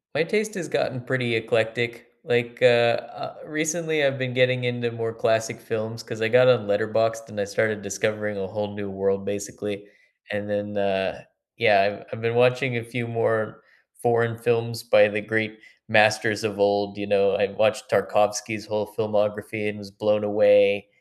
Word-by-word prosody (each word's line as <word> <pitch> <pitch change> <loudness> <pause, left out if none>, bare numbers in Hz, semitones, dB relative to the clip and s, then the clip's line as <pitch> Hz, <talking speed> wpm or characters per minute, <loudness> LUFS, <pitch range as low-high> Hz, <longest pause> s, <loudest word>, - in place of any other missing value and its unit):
My - - +3
taste 215 +4 -1
has 170 -4 -4
gotten 130 -4 -2
pretty 125 -2 -1
eclectic. 115 +1 -1 0.2
Like, 120 0 -1
uh - - +6
uh, 120 -1 +2
recently 155 0 -1
I've 135 0 +2
been 130 -1 -3
getting 125 0 +2
into 120 -1 -2
more 115 -1 -4
classic 110 0 0
films, 115 0 -5
'cause 115 0 -8
I 110 - +2
got 125 +3 +5
on 120 -5 +4
Letterboxd 110 +2 0
and 105 0 -7
I 100 - 0
started 105 +1 -1
discovering 105 +1 -2
a 95 -1 -4
whole 105 +1 -4
new 100 -1 -6
world, 95 0 -1
basically. 100 0 -5 0.5
And 105 0 -4
then, 105 0 -3
uh 95 -1 -1 0.3
yeah, 100 +1 +3
I've - - -17
I've - - -7
been 115 0 -1
watching 125 0 +3
a 115 - -3
few 115 +1 -5
more 115 -1 -1 0.4
foreign 115 -1 +1
films 115 0 -1
by 105 -3 +6
the 105 0 -2
great 110 0 -2 0.3
masters 110 0 +3
of 105 -2 -3
old, 100 0 +1
you 100 - -4
know, 100 -1 +3
I - - +2
watched - - 0
Tarkovsky's 105 +1 0
whole 105 -1 -3
filmography 105 0 -1
and 105 - -6
was 100 -1 -11
blown 105 +1 0
away, - - +4
110 Hz, 175 wpm, -24 LUFS, 105-120 Hz, 0.5 s, uh